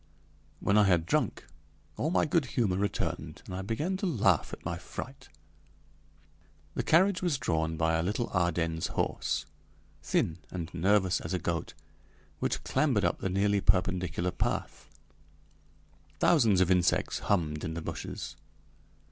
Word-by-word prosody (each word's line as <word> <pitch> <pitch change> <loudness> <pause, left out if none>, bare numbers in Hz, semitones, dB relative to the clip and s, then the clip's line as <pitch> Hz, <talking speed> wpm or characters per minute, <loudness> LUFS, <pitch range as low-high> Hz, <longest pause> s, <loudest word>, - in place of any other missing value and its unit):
When 100 +2 +3
I 105 - +6
had 85 -4 +3
drunk - - 0 0.5
all 155 - -1
my 170 - +2
good 155 -1 +2
humor 105 -7 +2
returned 100 +2 -2
and - - -8
I 95 - -3
began 145 - -2
to 195 - -1
laugh 100 - +2
at - - -9
my - - -3
fright. 135 +2 -8 1.4
The - - -1
carriage 185 +3 +3
was 175 -6 +1
drawn 80 -7 -1
by 80 0 +2
a 80 - +2
little 105 +7 -1
Ardennes 85 -3 0
horse, - - -1 0.6
thin 80 +1 0
and 85 -3 -6
nervous 95 +1 +2
as 85 +3 -3
a - - +1
goat, 85 0 -3 0.6
which - - -1
clambered 130 -7 +2
up - - 0
the 95 - -2
nearly 100 +1 +2
perpendicular 90 -2 +1
path. - - -3 1.3
Thousands 115 - +4
of 95 0 +3
insects 90 -2 +2
hummed 75 -6 0
in 80 - -3
the 85 - -4
bushes. - - -6
95 Hz, 145 wpm, -30 LUFS, 85-115 Hz, 1.4 s, I